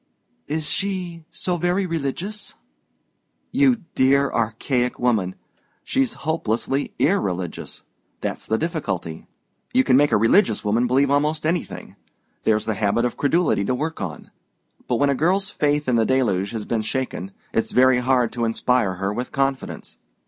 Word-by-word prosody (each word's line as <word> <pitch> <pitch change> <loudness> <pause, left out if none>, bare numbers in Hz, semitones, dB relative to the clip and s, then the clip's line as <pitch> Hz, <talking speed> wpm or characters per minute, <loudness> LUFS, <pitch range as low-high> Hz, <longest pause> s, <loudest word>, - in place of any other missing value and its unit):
"Is 155 +1 -2
she 175 0 -3
so 180 -1 -2
very 175 +3 +1
religious?" 175 +6 -4 1.0
"You 260 -5 +3
dear 140 +1 +3
archaic 120 +3 0
woman! 110 -7 +1 0.5
She's 265 -3 0
hopelessly 135 -3 -1
irreligious; 95 - -1 0.4
that's - - -4
the 110 - +1
difficulty. 100 - -3 0.5
You 130 - +5
can 130 -1 +4
make 145 +1 +4
a - - +5
religious 115 - +3
woman 115 +4 +2
believe 135 +3 +3
almost 150 +2 +1
anything: 165 +1 -3 0.4
there's 110 -1 +1
the 110 - 0
habit 105 +3 +1
of 125 - -2
credulity 145 - +2
to 125 +6 0
work 160 +5 -3
on. 80 -5 -6 0.6
But 125 - +1
when 140 +3 +3
a - - +3
girl's 185 +8 +1
faith 150 -1 0
in 125 -2 +3
the 110 - +3
Deluge 105 -8 +1
has 110 -2 -5
been 115 -2 0
shaken, 110 -4 -3 0.2
it's 115 - +1
very 130 0 +4
hard 125 -2 +2
to 120 -1 -1
inspire 115 -3 +1
her 95 +2 -2
with 125 +4 -4
confidence. 135 -1 -2
130 Hz, 150 wpm, -22 LUFS, 115-160 Hz, 1.0 s, You